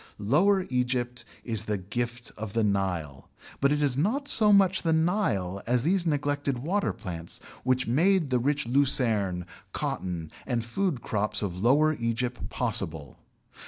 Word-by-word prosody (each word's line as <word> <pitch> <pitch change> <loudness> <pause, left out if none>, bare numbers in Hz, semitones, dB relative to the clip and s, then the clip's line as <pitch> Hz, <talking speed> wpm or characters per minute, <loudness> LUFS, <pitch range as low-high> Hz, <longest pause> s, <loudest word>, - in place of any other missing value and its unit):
Lower 180 - +2
Egypt 125 -1 -1 0.2
is 110 -3 -2
the 105 -1 -1
gift 120 +5 -4
of 105 -2 -7
the 115 -1 +1
Nile, 90 -9 -2 0.3
but 140 +1 +3
it 150 0 +1
is 140 -3 +1
not 225 - 0
so 215 -6 +7
much 195 -2 +4
the 165 -1 +1
Nile 160 - 0
as 120 0 +1
these 175 +2 +1
neglected 145 -3 -1
water 180 +11 -1
plants 85 -5 -6 0.2
which 130 0 +1
made 165 +4 +2
the 125 - +3
rich 140 +1 0
lucerne, 115 -9 +2 0.3
cotton, 85 -4 -3 0.2
and 120 -3 -1
food 150 +2 -1
crops 105 0 -1
of 90 -2 -4
Lower 145 +7 +4
Egypt 120 0 -3
possible. - - -2
125 Hz, 150 wpm, -27 LUFS, 105-155 Hz, 0.3 s, so